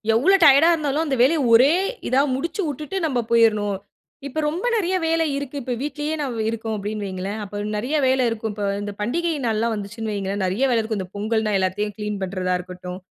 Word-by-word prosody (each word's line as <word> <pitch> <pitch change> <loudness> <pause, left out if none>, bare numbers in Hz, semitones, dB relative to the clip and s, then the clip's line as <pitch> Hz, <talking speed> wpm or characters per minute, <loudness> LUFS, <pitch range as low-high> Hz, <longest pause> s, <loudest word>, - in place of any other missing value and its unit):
எவ்ளோ 375 +12 +5
டயர்டா 295 +3 +7
இருந்தாலும் 305 -1 0
அந்த 275 -3 0
வேலைய 300 +5 +4
ஒரே 265 +7 +7 0.3
இதா 260 +2 +3
முடிச்சு 335 +9 -3
விட்டுட்டு 300 +7 -5
நம்ம 260 -5 0
போயிர்ணும். 210 -4 +3 0.5
இப்போ 310 +3 -4
ரொம்ப 340 +9 -2
நிறையா 375 -4 +1
வேலை 325 0 +2
இருக்கு. 285 0 -6
இப்ப 250 - -2
வீட்லயே 295 +2 -3
நான் 260 -5 -3
இருக்கோம் 225 -1 -3
அப்பிடின்னு 210 0 -4
வையுங்களேன்! 195 +3 -4
அப்ப 205 +1 -5 0.2
நிறைய 255 +9 -2
வேலை 260 0 +3
இருக்கும். 225 -1 -3
இப்போ 205 -1 -3 0.2
இந்த 205 0 -4
பண்டிகை 335 +10 0
நாள்லாம் 225 +1 0
வந்துச்சுன்னு 215 +2 -5
வையுங்களேன்! 200 -1 -2
நெறைய 195 +9 0
வேலை 230 - +3
இருக்கும். 220 -2 -3
இந்த 185 -1 -5
பொங்கல்னா 215 0 0
எல்லாத்தையும் 205 +2 -1
கிளீன் 210 -1 -3
பண்ணுறதா 185 -1 -1
இருக்கட்டும். 180 0 -8
225 Hz, 185 wpm, -22 LUFS, 205-285 Hz, 0.5 s, டயர்டா